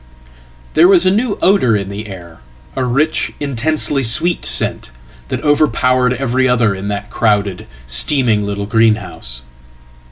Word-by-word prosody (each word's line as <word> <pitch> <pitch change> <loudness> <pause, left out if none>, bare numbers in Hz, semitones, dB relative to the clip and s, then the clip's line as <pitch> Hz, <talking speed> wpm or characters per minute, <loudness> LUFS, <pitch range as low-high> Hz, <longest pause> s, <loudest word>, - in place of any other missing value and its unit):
There 165 +3 +5
was 185 -2 +5
a 185 - +4
new 215 +2 -1
odour 180 - +3
in 100 -2 -3
the 105 +2 -7
air, 85 -4 -11 0.4
a 130 - -1
rich, 140 +6 0
intensely 145 +1 -1
sweet 150 +9 +2
scent, - - -1 0.4
thatoverpowered 130 -4 +1
every 130 0 0
other 115 -4 +2
in 95 +1 -6
that 100 0 -5
crowded, 105 -4 -1 0.2
steaming 105 - +2
little 100 0 -4
greenhouse. 105 - -1
120 Hz, 130 wpm, -15 LUFS, 100-145 Hz, 0.4 s, There